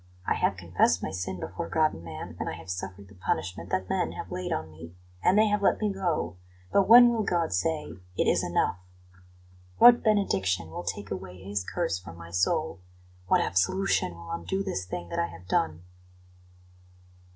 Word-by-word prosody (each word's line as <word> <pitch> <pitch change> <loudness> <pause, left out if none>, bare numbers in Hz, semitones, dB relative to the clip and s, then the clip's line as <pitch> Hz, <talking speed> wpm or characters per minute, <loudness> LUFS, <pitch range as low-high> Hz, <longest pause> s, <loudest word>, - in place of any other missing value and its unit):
I - - +2
have - - 0
confessed - - +1
my - - -2
sin 90 0 -4
before 170 - -5
God 155 -1 +2
and 80 - -10
man, 80 -2 -8
and - - -2
I - - -4
have 90 - -8
suffered 95 +2 -6
the 100 - -16
punishment 90 -1 -3
that 95 0 -1
men - - -1
have - - -7
laid 90 - -4
on 80 0 -3
me, 80 +2 -12 0.3
and 185 - +4
they 215 - +6
have 210 0 +1
let 200 - +3
me 210 -2 0
go; 160 - -2 0.3
but 195 -1 +3
when 240 +1 +10
will 230 -2 0
God 175 - 0
say, 150 - 0 0.3
'It - - +2
is - - +3
enough'? 90 - 0 1.0
What 240 0 +8
benediction 95 - +1
will 85 - -5
take 100 +3 -5
away 95 -1 -6
His 100 0 -2
curse 165 - -2
from 85 -2 -11
my 85 0 -11
soul? 155 - 0 0.5
What - - +4
absolution 95 - +1
will 85 0 -10
undo 85 - -2
this 185 - -3
thing 90 -1 -5
that - - -2
I 85 - +1
have 85 +1 -13
done?" 80 -2 0
95 Hz, 190 wpm, -28 LUFS, -, 1.0 s, when